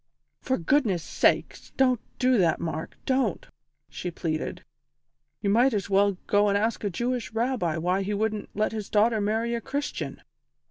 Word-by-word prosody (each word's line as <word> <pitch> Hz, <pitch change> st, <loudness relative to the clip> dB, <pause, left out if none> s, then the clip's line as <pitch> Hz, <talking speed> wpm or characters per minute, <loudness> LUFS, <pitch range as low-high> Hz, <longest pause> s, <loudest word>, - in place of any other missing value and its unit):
"For 260 Hz, -, -1 dB
goodness' 195 Hz, -, +1 dB
sake, -, -, +2 dB, 0.2 s
don't 255 Hz, -3 st, +3 dB, 0.2 s
do 255 Hz, -2 st, +3 dB
that, 170 Hz, -4 st, +3 dB
Mark 160 Hz, -1 st, -4 dB
don't!" 265 Hz, -, 0 dB, 0.4 s
she 180 Hz, -, -5 dB
pleaded. 160 Hz, -2 st, -3 dB, 0.8 s
"You 200 Hz, -, +2 dB
might 240 Hz, +3 st, +4 dB
as 200 Hz, -1 st, -3 dB
well 200 Hz, 0 st, +3 dB
go 205 Hz, 0 st, +3 dB
and 200 Hz, -, +3 dB
ask 220 Hz, +2 st, -1 dB
a 205 Hz, -, 0 dB
Jewish 240 Hz, +5 st, -2 dB
Rabbi 225 Hz, -8 st, 0 dB
why 180 Hz, +4 st, +1 dB
he 205 Hz, +2 st, -2 dB
wouldn't 215 Hz, 0 st, -2 dB
let 215 Hz, +1 st, +1 dB
his 215 Hz, -2 st, -5 dB
daughter 220 Hz, +1 st, +3 dB
marry 225 Hz, +3 st, 0 dB
a 235 Hz, -, -2 dB
Christian. 280 Hz, +3 st, -4 dB
210 Hz, 165 wpm, -26 LUFS, 195-245 Hz, 0.8 s, might